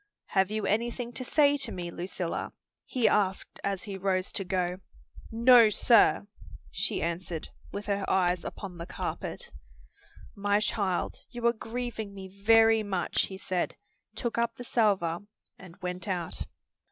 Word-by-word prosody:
"Have 190 -1 +2
you 215 0 -2
anything 235 +3 -1
to 255 - -4
say 290 +2 +4
to 280 - -1
me, 175 -1 -5
Lucilla?" 175 0 -4 0.3
he 245 -4 +1
asked 195 -2 0
as 195 -2 -1
he 195 -2 -6
rose 185 -1 0
to 195 - 0
go. 180 -1 -1 0.5
"No, 235 0 +7
sir," 225 0 +5 0.5
she - - 0
answered, 170 -1 -3 0.2
with 205 +1 -5
her 200 -1 -1
eyes 180 -2 +2
upon 185 -4 -7
the 170 - -6
carpet. - - -5 0.8
"My 205 0 +1
child, 200 -4 -1
you 240 -1 -6
are 235 - +5
grieving 225 -3 -5
me 190 -1 -7 0.2
very 225 0 +6
much," 195 -4 0
he 190 - -8
said, 185 -2 -2 0.4
took 235 -2 -2
up 235 0 0
the 245 - -8
salver 195 -9 +2 0.4
and 180 -2 -13
went 180 +1 -3
out. 180 -4 -3
200 Hz, 150 wpm, -29 LUFS, 180-225 Hz, 0.8 s, No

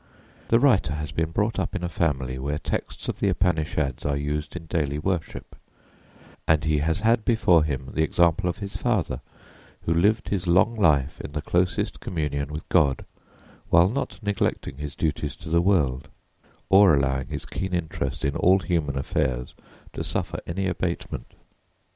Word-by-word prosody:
The 115 - +4
writer 120 - +3
has 75 -1 -4
been 80 +1 -1
brought 105 +6 0
up - - -2
in 90 - -3
a - - 0
family 65 -7 -1
where 70 +2 -2
texts - - -4
of - - -3
the 100 - +2
Upanishads 80 -7 0
are 70 -1 0
used 75 +2 -3
in 85 -2 -6
daily 75 -4 -1
worship; 85 +1 -3 0.9
and 80 -2 +3
he 75 -1 +2
has 80 +5 0
had 115 0 +3
before 90 -9 +4
him 70 -3 -3
the 80 - 0
example 85 +2 +2
of 85 - -3
his 100 -1 -7
father, 110 -8 -1 0.6
who 80 - 0
lived 105 +7 +2
his 95 -3 -1
long 90 +7 +4
life 75 -8 +2
in 70 - -8
the 75 - -2
closest 90 +2 0
communion 75 -4 -2
with 75 +1 -6
God, 70 -7 +2 0.6
while 85 +2 +5
not 140 +6 -3
neglecting 100 -9 -1
his 75 0 -6
duties 75 -3 -2
to - - -10
the 85 +1 +3
world, 75 -8 +1 0.6
or 95 -4 +7
allowing 65 -1 0
his - - -5
keen 95 -1 -4
interest 80 -5 -3
in 70 - 0
all 95 +2 +5
human 80 -6 -1
affairs 65 -2 -1 0.4
to - - -4
suffer - - -2
any 95 +3 -2
abatement. 90 -1 -3
80 Hz, 170 wpm, -25 LUFS, 75-95 Hz, 0.9 s, or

